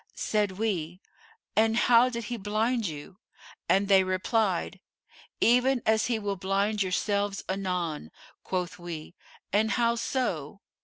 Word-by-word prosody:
Said 210 -3 0
we, 185 -5 -2 0.6
'And 225 +1 +3
how 240 +1 +5
did 235 -2 -4
he 240 +3 -4
blind 220 +2 0
you?' 155 +5 -8 0.5
and 195 +1 +3
they 195 -1 +6
replied, 185 0 0 0.6
'Even 250 +2 +4
as 220 0 +3
he 240 -2 0
will 205 -2 -3
blind 200 +3 0
yourselves 200 +2 0
anon.' 180 - -2 0.3
Quoth 180 -1 -3
we, 170 -2 -7 0.4
'And 215 +2 +3
how 235 0 +2
so? 205 - -2
200 Hz, 125 wpm, -28 LUFS, 185-225 Hz, 0.6 s, they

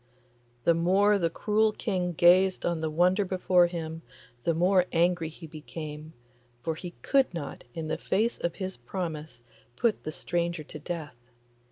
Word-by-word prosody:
The 170 - +5
more 195 +5 +3
the 170 -2 +1
cruel 215 +5 +1
King 180 -5 -1
gazed 180 +3 +5
on 170 -2 0
the 160 - -1
wonder 180 +5 +3
before 185 -1 +3
him, 165 -2 -5 0.4
the 170 - +2
more 180 +2 +4
angry 170 -1 +2
he 165 +1 -11
became, 155 0 -8 0.5
for 160 - -1
he 175 +2 -8
could 270 -2 +3
not, 145 -5 -6
in 160 -1 -4
the 160 +1 -2
face 220 +7 0
of 170 - -2
his 190 -1 -5
promise, 155 -1 -5 0.3
put 230 - +1
the 155 - -4
stranger 170 0 -2
to 150 - -9
death. 155 -3 -5
170 Hz, 160 wpm, -28 LUFS, 160-185 Hz, 0.5 s, The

